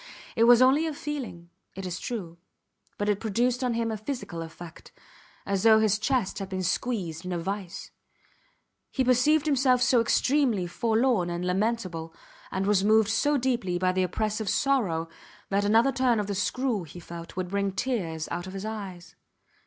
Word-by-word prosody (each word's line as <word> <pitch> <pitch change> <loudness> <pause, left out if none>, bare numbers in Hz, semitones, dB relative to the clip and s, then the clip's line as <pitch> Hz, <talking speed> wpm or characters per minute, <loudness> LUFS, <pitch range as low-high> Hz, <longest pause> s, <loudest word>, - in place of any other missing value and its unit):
It 230 - +4
was 240 +1 +7
only 285 +5 +4
a 310 - -4
feeling, 250 - -6 0.2
it 195 0 -6
is 180 0 -4
true, 175 -8 -5 0.6
but 205 - -2
it 205 -1 +1
produced 240 +4 0
on 245 -2 0
him 230 -1 -1
a 220 - -3
physical 210 -7 -5
effect, 165 0 -10 0.5
as 195 -1 0
though 220 +1 +7
his 215 -1 +2
chest 215 -4 0
had 195 -1 -5
been 185 -1 -3
squeezed 180 -4 -2
in 180 - -5
a 175 - -1
vice. 195 +1 -5 1.0
He 265 - 0
perceived 255 +5 +3
himself 265 -4 +3
so 255 -2 +4
extremely 245 -4 +2
forlorn 225 0 +1
and 175 +1 -3
lamentable, 185 -4 -2 0.4
and 190 +1 -1
was 200 -1 +3
moved 215 0 +4
so 290 +6 +2
deeply 240 -9 0
by 185 +1 +2
the 185 0 0
oppressive 215 +3 -1
sorrow, 205 - +1 0.4
that 200 +1 +1
another 225 +6 +4
turn 250 -4 +2
of 205 - -1
the 200 - -3
screw, 235 +3 -1
he 170 +2 -11
felt, 170 0 -9
would 185 -1 -3
bring 200 0 0
tears 185 -8 -2
out 175 +2 -4
of 185 - -8
his 195 +1 -5
eyes. 190 -5 -7
210 Hz, 175 wpm, -27 LUFS, 185-245 Hz, 1.0 s, was